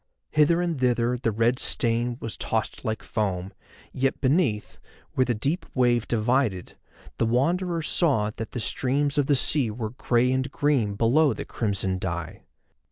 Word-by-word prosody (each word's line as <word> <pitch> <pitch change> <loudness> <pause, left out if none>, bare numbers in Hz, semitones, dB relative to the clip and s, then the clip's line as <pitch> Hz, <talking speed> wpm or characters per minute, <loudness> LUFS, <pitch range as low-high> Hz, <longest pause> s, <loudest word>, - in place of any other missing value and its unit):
Hither 165 +3 +3
and 170 -5 -2
thither 120 -1 +1
the 115 -2 0
red 115 +4 +1
stain 120 -1 0
was 115 - -5
tossed 110 -1 -3
like 110 -2 -3
foam, 95 -5 -2 0.4
yet 135 +1 0
beneath, 130 - 0 0.3
where 130 - +2
the 120 - 0
deep 140 - -1
wave 120 -2 +2
divided, 115 -4 0 0.4
the - - +3
Wanderer 170 +8 +1
saw 135 - +1
that 115 - -5
the - - -5
streams 140 +5 0
of 140 - +1
the 145 - +4
sea 135 -2 +2
were 110 0 -4
grey 125 0 +1
and 130 +1 0
green 130 -10 +1
below 135 +8 +3
the - - -6
crimson 95 -4 -2
dye. 85 -2 -4
120 Hz, 160 wpm, -25 LUFS, 110-140 Hz, 0.4 s, the